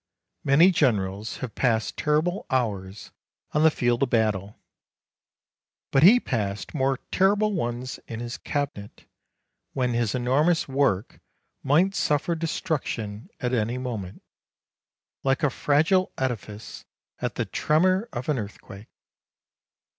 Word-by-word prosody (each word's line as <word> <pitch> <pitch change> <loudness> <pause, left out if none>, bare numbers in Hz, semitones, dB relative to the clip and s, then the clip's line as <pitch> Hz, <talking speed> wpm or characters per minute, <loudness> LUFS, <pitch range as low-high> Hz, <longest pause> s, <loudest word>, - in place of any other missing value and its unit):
Many 155 +7 +6
generals 105 - 0
have 115 - -10
passed 115 -4 0
terrible 155 +6 0
hours 105 -7 -2 0.4
on 150 - +1
the 160 - +7
field 120 -4 0
of 135 - +2
battle; 105 -3 0 1.3
but 135 - +4
he 210 +10 +8
passed 100 - -3
more 135 -3 +1
terrible 205 +2 +3
ones 125 -6 -3
in 115 - -6
his 120 +1 -5
cabinet, 140 -8 -4 0.7
when 125 -2 0
his 120 -1 0
enormous 145 +7 +2
work 135 -7 0 0.4
might 165 +8 +3
suffer 150 -1 +1
destruction 150 - -3
at 125 -4 -2
any 115 +1 0
moment, 110 -8 -5 1.0
like 135 +1 +1
a 145 - +3
fragile 160 +9 +2
edifice 110 -5 -4 0.4
at - - -2
the - - -1
tremor 185 +7 +1
of 120 -1 -5
an 150 -5 +1
earth 105 -1 -7
quake. 100 +2 -12
130 Hz, 125 wpm, -25 LUFS, 110-155 Hz, 1.3 s, he